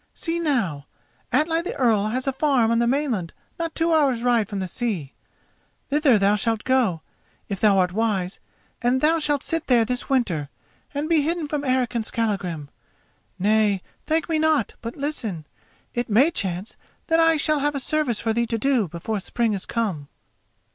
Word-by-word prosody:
See 335 0 -2
now, 210 - -1 0.4
Atli 320 +6 +2
the 345 - -5
Earl 220 -5 +2
has 255 +4 -1
a 270 - 0
farm 260 -5 +2
on 230 - +2
the 235 - +2
mainland 245 - -1 0.3
not 330 -1 -3
two 330 0 +2
hours' 270 -7 +2
ride 235 -4 +2
from 205 - -4
the 190 -1 -2
sea. 180 - -3 0.8
Thither 285 -5 +4
thou 200 +1 +3
shalt 225 +1 0
go, 240 -11 +1 0.5
if 200 -2 -3
thou 205 -3 +4
art 180 -1 +2
wise, 195 -3 -1 0.4
and 245 +2 +2
thou 320 +4 +3
shalt 290 -2 0
sit 330 -1 -2
there 240 -3 +4
this 250 +2 -3
winter 185 - 0 0.5
and 290 +2 -1
be 325 -2 +3
hidden 325 +1 -1
from 290 -1 -2
Eric 255 -2 +1
and 235 -2 -1
Skallagrim. 195 -10 -2 0.7
Nay, 205 -1 +2 0.2
thank 320 +1 +1
me 320 -2 0
not, 310 -7 +2
but 230 0 -6
listen: 230 - -3 0.5
it 240 0 -2
may 255 +10 +5
chance 190 - -3 0.3
that 325 0 +2
I 325 -1 +5
shall 305 0 +2
have 290 +1 0
a - - 0
service 270 -3 0
for 225 - 0
thee 235 +1 0
to 230 - -1
do 250 -4 +1
before 175 +6 -4
spring 225 +3 -1
is 195 - -4
come." 195 -12 -2
240 Hz, 180 wpm, -23 LUFS, 205-290 Hz, 0.8 s, may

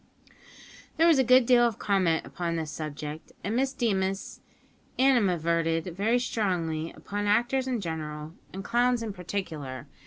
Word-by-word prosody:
There 325 - +5
was 330 -5 +5
a - - +5
good 255 0 +6
deal 245 0 +5
of 235 -3 +2
comment 185 -6 +1
upon 170 -1 -3
this 160 -2 -3
subject, 155 0 -6
and 205 +4 -2
Miss 265 +2 +1
Deemas 195 -7 -1 0.6
animadverted 170 -9 +2
very 220 +6 +2
strongly 175 -9 -1
upon 205 0 -4
actors 240 +5 +2
in 245 -4 -1
general 155 -2 -5 0.2
and 195 +1 -6
clowns 240 +1 +2
in 215 -3 -4
particular. 160 -8 -5
195 Hz, 145 wpm, -28 LUFS, 165-240 Hz, 0.6 s, good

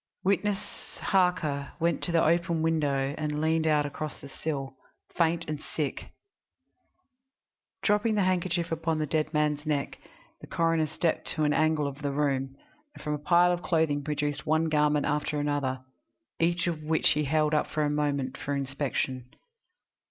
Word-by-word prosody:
Witness 200 +1 +2 0.4
Harker 180 -7 +1
went 170 0 +1
to 175 - 0
the 165 -1 +3
open 170 0 +2
window 145 -4 +1
and 150 -1 -2
leaned 160 +1 +1
out 150 -1 +3
across 150 +1 -5
the 140 - -10
sill, 135 -2 -4 0.4
faint 170 0 +1
and 150 -1 -4
sick. 150 -3 -4 1.7
Dropping 210 +1 +2
the 205 - +3
handkerchief 175 -2 0
upon 165 0 0
the 155 - 0
dead 155 +1 0
man's 150 -1 +1
neck, 150 -2 -2 0.4
the - - -11
coroner 165 -1 +1
stepped 165 +2 -1
to 155 - 0
an 150 0 +3
angle 155 -1 +2
of 140 +1 -5
the 145 -1 -1
room, 135 -2 0 0.4
and - - -12
from 150 0 -1
a 150 - -2
pile 175 +4 +4
of 175 0 -1
clothing 160 -3 +1
produced 150 -1 -2
one 160 +1 +1
garment 150 -1 +2
after 150 0 -1
another, 145 -3 -1 0.6
each 170 +1 +2
of 165 -3 -2
which 155 +1 +2
he 150 0 +1
held 155 +1 +2
up 150 - +2
a 150 -1 +3
moment 145 -3 -1
for 145 - -3
inspection. 135 -2 -2
155 Hz, 160 wpm, -28 LUFS, 145-165 Hz, 1.7 s, pile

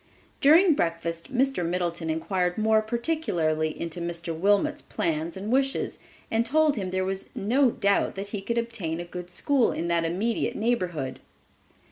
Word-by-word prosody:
During 325 +5 +7
breakfast 170 - -2
Mr. 265 -5 +1
Middleton 170 -1 -2
inquired 180 +2 -1
more 220 0 +3
particularly 215 - -1
into 170 +1 -4
Mr. 170 -1 -4
Wilmot's 200 +5 +2
plans 165 +1 -2
and 205 +4 -4
wishes, 270 +1 0 0.3
and 225 +1 +2
told 300 +4 +3
him 195 -5 -3
there 185 0 -1
was 190 0 -3
no 250 +6 +3
doubt 200 -4 +1
that 195 +1 -5
he 205 -2 -4
could 235 +4 -2
obtain 215 -9 -2
a 175 - -4
good 180 0 -8
school 255 +7 +2
in 170 - -3
that 170 -1 +2
immediate 195 +8 -1
neighborhood. 180 - -1
190 Hz, 155 wpm, -26 LUFS, 170-235 Hz, 0.3 s, During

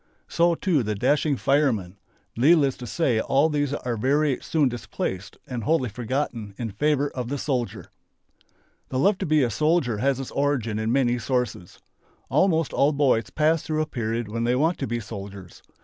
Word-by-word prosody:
So 170 0 +2
too 165 -5 +1
the 105 -2 -2
dashing 140 +6 +1
"fireman." 115 -11 +1 0.4
Needless 140 +1 +4
to 125 - -8
say 130 -6 +1
all 140 +7 +2
these 145 -2 0
are 125 -4 -3
very 140 +4 +1
soon 155 -4 +1
displaced 105 -5 -5
and 120 -3 -5
wholly 130 -1 +1
forgotten 115 -2 -3
in 115 -3 -4
favour 145 +6 0
of 125 -2 -5
the 145 - -2
"soldier." 125 -4 -3 1.0
The 130 - -2
love 190 +8 +3
to 190 - -2
be 155 -2 +3
a 120 - 0
soldier 150 -8 +1
has 135 +2 +1
its 135 - -6
origin 130 -7 0
in 110 +1 -1
many 125 -2 +2
sources. 120 -6 -2 0.5
Almost 160 +2 +2
all 145 +2 +3
boys 135 -5 +2
pass 155 +1 +2
through 155 0 -1
a - - -3
period 115 -5 -3
when 115 +2 -3
they 120 +1 +2
want 160 +6 +1
to 135 - -2
be 120 +1 -2
soldiers. 100 -3 -9
130 Hz, 180 wpm, -24 LUFS, 115-150 Hz, 1.0 s, Needless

